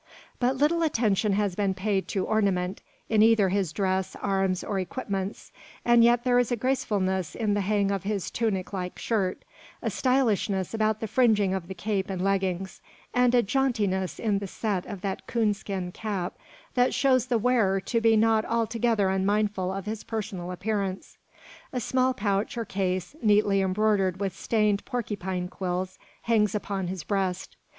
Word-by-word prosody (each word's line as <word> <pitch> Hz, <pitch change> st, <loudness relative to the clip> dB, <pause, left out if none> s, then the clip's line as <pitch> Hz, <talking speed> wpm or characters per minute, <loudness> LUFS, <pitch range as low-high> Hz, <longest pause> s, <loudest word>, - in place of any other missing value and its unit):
But 255 Hz, +2 st, +2 dB
little 305 Hz, +5 st, +2 dB
attention 220 Hz, -, +2 dB
has 200 Hz, -1 st, +1 dB
been 195 Hz, 0 st, 0 dB
paid 195 Hz, 0 st, -1 dB
to 190 Hz, -2 st, -1 dB
ornament 195 Hz, -3 st, 0 dB, 0.3 s
in 220 Hz, -1 st, +3 dB
either 220 Hz, -3 st, +5 dB
his 190 Hz, -3 st, 0 dB
dress, 190 Hz, +2 st, -1 dB
arms, 195 Hz, -2 st, 0 dB
or 200 Hz, -2 st, -2 dB
equipments; 195 Hz, 0 st, -4 dB, 0.3 s
and 240 Hz, -1 st, +6 dB
yet 240 Hz, 0 st, +4 dB
there 245 Hz, -1 st, +4 dB
is 245 Hz, -1 st, +1 dB
a -, -, +3 dB
gracefulness 195 Hz, -, -1 dB
in 215 Hz, -3 st, 0 dB
the 205 Hz, -, +1 dB
hang 200 Hz, 0 st, +1 dB
of 195 Hz, -2 st, -1 dB
his 200 Hz, -1 st, -3 dB
tunic 205 Hz, -5 st, -1 dB
like 180 Hz, -2 st, -4 dB
shirt; 195 Hz, -5 st, -1 dB, 0.3 s
a -, -, -2 dB
stylishness 220 Hz, -8 st, +1 dB
about 215 Hz, -1 st, 0 dB
the 220 Hz, -, -2 dB
fringing 210 Hz, -5 st, +3 dB
of 190 Hz, -3 st, -3 dB
the 190 Hz, -, -6 dB
cape 195 Hz, +2 st, -2 dB
and 190 Hz, -2 st, -3 dB
leggings; 190 Hz, -1 st, -1 dB, 0.3 s
and 250 Hz, 0 st, +4 dB
a 240 Hz, -, +5 dB
jauntiness 210 Hz, -6 st, 0 dB
in 210 Hz, -3 st, 0 dB
the 200 Hz, -, -5 dB
set 195 Hz, -1 st, -2 dB
of 200 Hz, -3 st, -7 dB
that 195 Hz, -1 st, -4 dB
coon 225 Hz, -3 st, +2 dB
skin 195 Hz, -3 st, -5 dB
cap 195 Hz, -3 st, -3 dB, 0.4 s
that 250 Hz, 0 st, +2 dB
shows 260 Hz, -3 st, +3 dB
the 245 Hz, -2 st, +2 dB
wearer 220 Hz, -5 st, +2 dB
to 230 Hz, +4 st, -1 dB
be 225 Hz, -1 st, +5 dB
not 220 Hz, 0 st, +3 dB
altogether 230 Hz, -2 st, +1 dB
unmindful 195 Hz, 0 st, 0 dB
of 195 Hz, 0 st, -5 dB
his 215 Hz, 0 st, -4 dB
personal 200 Hz, -5 st, -4 dB
appearance. 195 Hz, 0 st, -3 dB, 0.5 s
A 255 Hz, -, -2 dB
small 255 Hz, +2 st, +1 dB
pouch 205 Hz, +1 st, -1 dB
or 230 Hz, -, -2 dB
case, 185 Hz, -, -2 dB
neatly 205 Hz, -2 st, +3 dB
embroidered 190 Hz, -1 st, +1 dB
with 195 Hz, -2 st, -2 dB
stained 210 Hz, -3 st, +1 dB
porcupine 190 Hz, -7 st, -3 dB
quills, 185 Hz, 0 st, -4 dB, 0.2 s
hangs 215 Hz, -3 st, +2 dB
upon 195 Hz, -3 st, -2 dB
his 180 Hz, -2 st, -4 dB
breast. 190 Hz, -2 st, -2 dB
205 Hz, 170 wpm, -27 LUFS, 190-225 Hz, 0.5 s, and